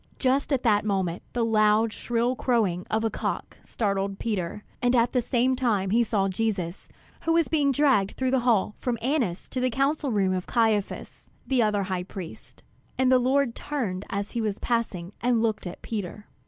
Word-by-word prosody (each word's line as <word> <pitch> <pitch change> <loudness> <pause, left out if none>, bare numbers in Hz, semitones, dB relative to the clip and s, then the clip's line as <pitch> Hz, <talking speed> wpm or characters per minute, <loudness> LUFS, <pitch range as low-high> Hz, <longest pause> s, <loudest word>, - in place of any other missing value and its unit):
Just 270 +3 +1
at 265 -3 +1
that 210 -4 +3
moment 190 -4 -1
the 235 -1 +1
loud, 215 0 +3
shrill 240 +1 0
crowing 210 -9 0
of 220 +1 0
a 225 - 0
cock - - -4
startled 195 -2 -1
Peter; 210 -2 -3 0.2
and 245 0 +3
at 235 0 +3
the 250 - +2
same 250 +2 +1
time 215 -7 0
he 235 +2 +4
saw 200 -3 +1
Jesus, 190 -3 -2 0.3
who 330 - +1
was 335 -2 +3
being 290 -3 +2
dragged 265 -8 +2
through 260 -1 0
the 265 - +3
hall 230 -4 +2
from 245 -2 -1
Annas 240 - -1
to 255 - -3
the 255 0 +1
council 275 +3 0
room 195 -3 +2
of 185 -1 -3
Caiphas, 220 -4 -1 0.2
the 260 -2 +2
other 210 -2 +2
high 185 -1 -2
priest. 180 -2 -9 0.3
And 260 0 +3
the 255 - +6
Lord 260 0 +2
turned 220 -12 -3
as 200 +1 -3
he 235 - -2
was 210 -2 -1
passing 205 -7 -2
and 240 -2 +2
looked 215 -4 -1
at 175 - -9
Peter. 205 -1 -5
225 Hz, 190 wpm, -26 LUFS, 200-255 Hz, 0.3 s, the